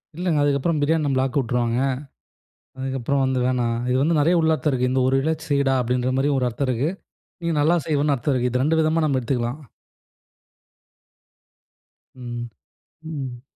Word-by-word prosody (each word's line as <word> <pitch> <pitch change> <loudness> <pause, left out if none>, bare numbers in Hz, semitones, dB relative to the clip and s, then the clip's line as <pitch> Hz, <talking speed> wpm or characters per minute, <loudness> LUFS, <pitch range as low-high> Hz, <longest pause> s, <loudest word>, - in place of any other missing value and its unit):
இல்லங்க, 170 -2 0
அதுக்கப்புறம் 145 +3 +1
பிரியாணி 155 +2 +2
நம்பள 135 -2 +1
ஆக்க 135 +1 -2
விட்டுருவாங்க. 120 -1 0 1.0
அதுக்கப்புறம், 135 +1 -1
வந்து 130 -1 0
வேணாம் 120 -2 0
இது 125 - +2
வந்து 160 +3 +2
நெறைய 165 +5 +3
உளார்த்தம் 160 -1 +1
இருக்கு. 125 0 +1
இந்த 130 0 +2
ஒரு 130 - +2
இழ 155 +4 +1 0.2
செய்யடா 140 -2 +2
அப்படின்ற 125 +1 0
மாதிரி 135 +2 +2
ஒரு 125 -1 +1
அர்த்தம் 130 +4 -3
இருக்கு. 130 +5 0 0.5
நீ 170 - -1
நல்லா 160 +4 +3
செய்வேன்னு 150 -2 +1
அர்த்தம் 135 +3 -1
இருக்கு. 125 0 0
இது 125 0 +1
ரெண்டு 160 +3 +2
விதமா 160 +1 +2
நம்ப 140 -3 +1
எடுத்துக்கலாம். 120 +2 -2 2.6
ம், 120 -2 -6 0.6
ம். 135 -6 -6
135 Hz, 155 wpm, -23 LUFS, 125-150 Hz, 2.6 s, நெறைய